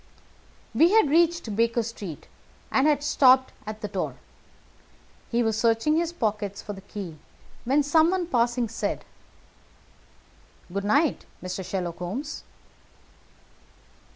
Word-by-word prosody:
We 340 +5 +5
had 435 -11 +5
reached 335 -8 +2
Baker 230 +1 +2
Street, 205 -8 -7 0.4
and 270 +3 +3
had 290 -1 +2
stopped 260 -3 +4
at 215 0 -6
the 210 - -3
door. - - -3 1.1
He 235 0 +1
was 220 -1 0
searching 230 +7 +2
his 335 0 0
pockets 210 - -2
for 205 - -6
the 195 - -10
key 185 -6 -8 0.5
when 280 +4 +3
someone 330 +5 +3
passing 240 -5 +1
said: 230 - -3 1.7
"Good 200 0 -2
night, 285 +8 +2
Mister 185 +1 -5
Sherlock 180 -2 -4
Holmes." 240 - -5
235 Hz, 120 wpm, -26 LUFS, 205-300 Hz, 1.7 s, We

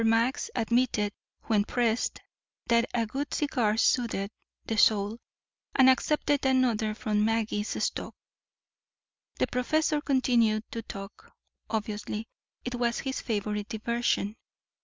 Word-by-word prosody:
Max 230 - +2
admitted 225 -3 +1 0.3
when 215 -3 +2
pressed 235 +1 0 0.4
that 235 0 +3
a 230 -2 +1
good 275 +6 -4
cigar 240 -8 +1
soothed 225 -4 +1 0.3
the 225 - -2
soul, 210 +1 +3 0.6
and 260 -1 +6
accepted 290 +1 +1
another 245 -5 +2
from 210 -1 0
Magee's 220 -1 0
stock. - - -3 1.2
The - - +2
professor 300 +4 +1
continued 240 -6 +2
to 230 - -4
talk. 195 -1 -10 0.4
Obviously 215 0 -3 0.4
it 250 - -3
was 240 -1 0
his 265 0 -3
favorite 210 -2 -2
diversion. 225 -2 -1
230 Hz, 115 wpm, -28 LUFS, 215-250 Hz, 1.2 s, and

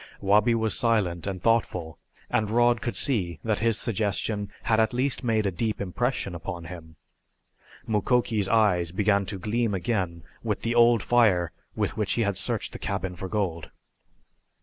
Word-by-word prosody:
Wabi 105 +4 +3
was 110 -2 0
silent 100 -7 +1
and 95 -3 -4
thoughtful 90 -8 0 0.3
and 110 -1 +1
Rod 120 +1 +3
could 120 - -3
see 90 - -1
that 110 -2 0
his 115 -1 +1
suggestion 105 -2 -1
had 110 -1 +2
at 110 +3 +2
least 130 +2 0
made 110 -3 +1
a 100 - +1
deep 110 +5 -2
impression 100 +1 -2
upon 85 0 -6
him. 85 -2 -10 0.9
Mukoki's 110 -1 +1
eyes 95 -7 +3
began 100 +1 +1
to 100 - -4
gleam 110 +2 -1
again 90 -5 -2 0.2
with - - -3
the 115 - 0
old 120 -2 +5
fire 105 -9 +3 0.2
with - - -2
which 105 -2 0
he 115 - +1
had 100 -2 0
searched - - -1
the - - -8
cabin 95 -2 -3
for 95 - -6
gold. 90 -6 -2
105 Hz, 165 wpm, -26 LUFS, 90-115 Hz, 0.9 s, old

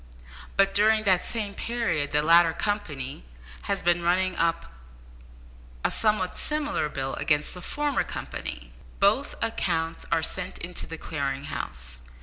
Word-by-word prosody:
But 195 0 +4
during 215 +2 +4
the 190 -3 +5
same 210 0 -3
period 200 -12 -1
the 150 0 +2
latter 165 +1 +6
company 150 - -3 0.5
has 200 -1 0
been 175 0 +3
running 185 +2 +2
up 165 - 0 1.1
a - - +3
somewhat 215 -4 +1
similar 295 - 0
bill 135 -2 -3
against 150 -1 +1
the 180 - -8
former 290 +7 0
company. - - -6 0.3
Both 215 +8 +3
accounts 165 -7 -1
are 165 -1 +3
sent 180 +2 -1
in 170 +1 -6
to - - -4
the 165 - -6
Clearing 140 -4 -3
House. 65 - -3
175 Hz, 140 wpm, -27 LUFS, 150-205 Hz, 1.1 s, latter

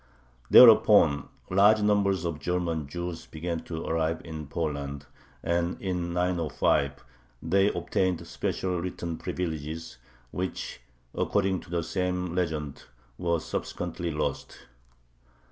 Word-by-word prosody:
Thereupon 105 -10 +7 0.2
large 105 +3 +5
numbers 100 -4 +2
of 85 -3 -3
German 85 -2 -1
Jews 85 +2 -5
began 85 +1 -4
to 80 -1 -5
arrive 80 0 0
in 80 -3 -7
Poland, 70 -2 -3 0.4
and, 85 +1 0
in 90 -3 -2
905, 85 -5 0 0.4
they 95 +4 +3
obtained 90 -1 -1
special 90 +1 -2
written 85 -2 -4
privileges, 80 -4 -4 0.3
which, 95 +1 -4 0.3
according 95 -2 +1
to - - -15
the 85 -1 -1
same 90 +1 -2
legend, 80 -5 -3 0.3
were 85 -1 +1
subsequently 85 +1 -4
lost. 75 -1 -4
85 Hz, 110 wpm, -27 LUFS, 80-90 Hz, 0.4 s, Thereupon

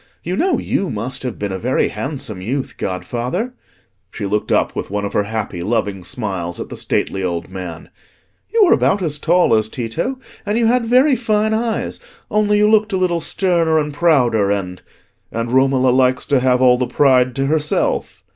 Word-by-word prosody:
You 180 +2 -2
know 345 - +1
you 195 - -1
must 125 +5 -4
have 125 -3 -4
been 100 -1 -3
a 95 - -4
very 125 +5 +1
handsome 135 -9 -5
youth, 130 +7 -3
godfather,"—she 120 - -5
looked 105 +2 -1
up - - +1
with - - -4
one 100 +1 -2
of 100 - -5
her 105 - +1
happy, 105 -5 -4
loving 100 -1 -1
smiles 90 -4 -3
at - - -6
the - - -7
stately 95 - -1
old 85 -2 -3
man—"you 95 - -5
were 350 - +5
about 195 -1 +2
as 150 -3 -2
tall 175 -5 +3
as 110 -1 +2
Tito, 120 - -3 0.3
and 205 +2 -1
you 235 - +2
had 240 +1 +2
very 260 +4 +4
fine 220 -2 +1
eyes; 225 0 -2 0.3
only 210 0 +2
you 210 0 +4
looked 215 0 +3
a - - +2
little 180 -2 +1
sterner 170 -3 +1
and 150 -1 -1
prouder, 125 -10 +3
and—" 90 -3 -2 0.5
"And 115 +1 -3
Romola 130 0 +3
likes 130 0 +2
to 140 -2 +2
have 125 0 +2
all 125 -1 +5
the 125 - 0
pride 130 -1 +3
to 135 - 0
herself?" 150 +1 -1
130 Hz, 185 wpm, -18 LUFS, -, 0.5 s, were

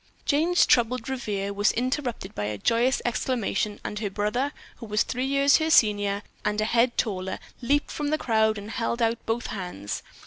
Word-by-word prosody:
Jane's 325 +5 +3
troubled 245 +1 +2
reverie 210 -7 -2
was 205 +1 +2
interrupted 245 -5 -2
by 105 - -3
a 105 0 -3
joyous 235 - +2
exclamation, 230 -4 -1
and 210 - -4
her 210 -2 -2
brother, 210 +8 -1 0.3
who 230 - -9
was 210 0 +2
three 255 +1 -2
years 275 +1 +4
her 315 0 0
senior 205 -7 +3 0.2
and 210 - 0
a 215 - +2
head 235 +2 +2
taller, 190 -3 -1 0.2
leaped 285 +4 +1
from 295 - -3
the 305 +1 +1
crowd 220 -4 +2
and 205 +2 -7
held 235 +1 -2
out 230 0 0
both 230 +1 -1
hands. 180 - -5
230 Hz, 180 wpm, -26 LUFS, 205-255 Hz, 0.3 s, years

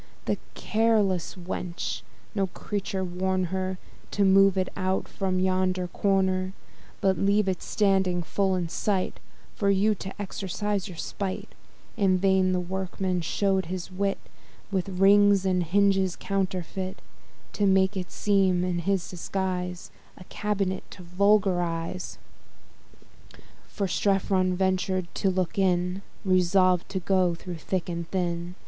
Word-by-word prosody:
That - - 0 0.2
careless 215 -6 +1
wench! 175 - -4 0.3
no 195 -1 +1
creature 195 0 -3
warn 185 +1 -1
her 190 0 -2 0.3
To 205 - +1
move 195 0 +5
it 185 -1 +1
out 190 0 -1
from 185 -1 -1
yonder 185 -1 +1
corner! 190 -1 +1 0.5
But 190 -2 +2
leave 200 +1 +3
it 185 -2 -1
standing 190 -4 +1
full 190 +3 0
in 175 -2 -1
sight, 190 +2 -1 0.3
For 200 - 0
you 200 +2 +3
to 190 0 -8
exercise 205 0 -2
your 180 -4 -9
spight? 190 +2 -4 0.4
In 190 -2 +3
vain 190 0 +3
the 180 - +1
workman 185 0 -2
shew'd 190 +2 0
his 185 0 -5
wit, 195 +1 0 0.5
With 190 -1 -1
rings 200 +1 +5
and 185 -1 +2
hinges 190 +1 +2
counterfeit, 190 -1 -3 0.5
To 205 - +1
make 190 +1 +3
it 185 -2 -4
seem 190 -3 +2
in 180 -1 -1
this 195 -3 +1
disguise 180 0 -3 0.3
A - - -11
cabinet 195 -1 -2
to 185 - -11
vulgar 190 +1 +3
eyes: 165 +1 -4 1.6
Which 195 -3 0
Strephon 190 -2 +2
ventur'd 185 -1 0
to 195 - +1
look 185 +2 -1
in, 180 0 +1 0.2
Resolved 185 -1 +3
to 190 - -2
go 185 -1 +2
thro' 180 +1 -7
thick 175 +2 -3
and 170 -1 -4
thin. 175 -1 -2
190 Hz, 135 wpm, -27 LUFS, 180-195 Hz, 1.6 s, move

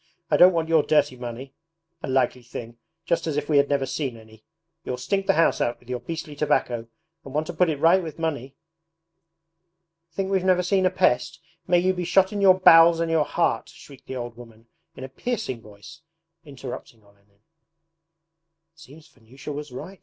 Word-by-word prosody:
I - - +4
don't 180 +1 +8
want 165 -2 -1
your 160 -1 +4
dirty 145 -3 +1
money! 125 +2 -8 0.5
A - - -5
likely 130 -1 +1
thing 120 0 -9 0.3
just 165 -1 -1
as 150 -2 -2
if 145 0 -2
we 150 - +2
had 140 0 +3
never 140 -2 +1
seen 130 -2 -4
any! 110 0 -17 0.4
You'll 125 - -4
stink 195 +10 -2
the - - +3
house 165 +1 +2
out 120 - -1
with 125 - -22
your 125 - -2
beastly 160 -1 -7
tobacco 125 -6 -1 0.4
and 135 - -11
want 155 +1 0
to 175 - -6
put 175 +1 +2
it 155 - -1
right 170 +5 +4
with 160 -3 -8
money! 145 -5 -4 1.6
Think 190 +3 -3
we've 190 -2 +1
never 185 -1 +3
seen 185 +1 +2
a - - +2
pest! 165 -3 0 0.3
May 175 0 +4
you 185 +2 +2
be 180 -1 -4
shot 190 +3 +2
in 205 - -2
your 190 -1 +5
bowels 165 -1 +7
and 165 -1 -1
your 160 -2 +2
heart!' 165 -10 -1
shrieked 140 -3 -16
the 130 - -6
old 120 -2 -6
woman 115 -1 -15 0.3
in - - -9
a - - -5
piercing 135 - -4
voice, 110 +9 -14 0.4
interrupting 130 -5 -10
Olenin. 100 0 -29 1.3
'It 165 - -26
seems 155 +1 -15
Vanyusha 135 +2 -11
was 145 -1 -7
right!' 180 +9 -9
150 Hz, 195 wpm, -24 LUFS, 125-170 Hz, 1.6 s, don't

